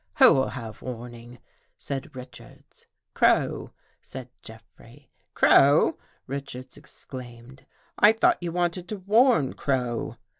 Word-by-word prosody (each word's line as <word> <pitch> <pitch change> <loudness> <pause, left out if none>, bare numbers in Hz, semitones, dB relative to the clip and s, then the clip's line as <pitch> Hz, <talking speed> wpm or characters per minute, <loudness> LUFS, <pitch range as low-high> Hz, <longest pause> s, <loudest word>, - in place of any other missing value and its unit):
"Who'll 130 0 +6
have 115 -4 -8
warning?" 120 -1 -9 0.4
said 135 0 -6
Richards. 125 -1 -14
" - - -60
Crow," - - +1 0.3
said 130 -1 -10
Jeffrey. 115 +4 -16
" - - -43
Crow! 145 +3 +4
" - - -39
Richards 130 -1 -7
exclaimed. 130 -3 -12 0.2
" - - -35
I 210 - +7
thought 225 - +2
you 175 -1 -4
wanted 175 +1 -2
to 215 - -5
warn 210 - +3
Crow?" 125 -4 -2
130 Hz, 125 wpm, -25 LUFS, 120-160 Hz, 0.4 s, I